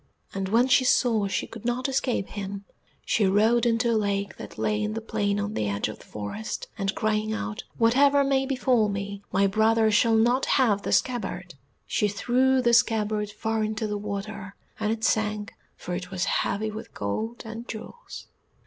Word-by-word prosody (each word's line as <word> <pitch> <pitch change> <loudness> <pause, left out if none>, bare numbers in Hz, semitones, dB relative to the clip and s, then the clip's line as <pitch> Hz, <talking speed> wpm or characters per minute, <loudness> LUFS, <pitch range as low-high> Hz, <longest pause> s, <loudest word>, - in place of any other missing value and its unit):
And 195 -1 -3
when 235 +5 +4
she 260 - +5
saw 230 -5 +3
she 195 - -1
could 225 - -11
not 245 +3 -1
escape 260 -6 -1
him, 200 -1 -6 0.4
she 210 -3 +2
rode 220 +5 +3
into 235 +1 +2
a - - +2
lake 200 -2 -1
that - - -9
lay 210 0 0
in 215 0 -2
the - - -1
plain 205 -2 -1
on 205 +1 -3
the 105 - -1
edge 100 0 -1
of 110 - -8
the - - -15
forest, 105 - -5
and, 195 -1 -2
crying 215 0 0
out, 220 +1 -4
"Whatever 280 +5 +4
may 270 -1 +1
befall 255 -5 +2
me, 200 0 -4
my 195 +2 +3
brother 220 +2 +3
shall 225 +2 +4
not 240 +4 +3
have 220 -7 +3
the - - -3
scabbard," 245 -3 -1 0.3
she 210 - +1
threw 255 +5 +2
the 235 -1 +3
scabbard 215 -2 +2
far 220 +1 -2
into 215 +1 -2
the 210 -1 -2
water, 200 -1 -6 0.2
and 215 0 0
it 225 0 -3
sank, 210 -2 0 0.2
for 180 - -6
it 180 0 -4
was 180 -1 -1
heavy 215 +3 0
with 215 +1 -9
gold 220 - -3
and 225 +2 -7
jewels. 355 - -9
215 Hz, 185 wpm, -26 LUFS, 200-235 Hz, 0.4 s, she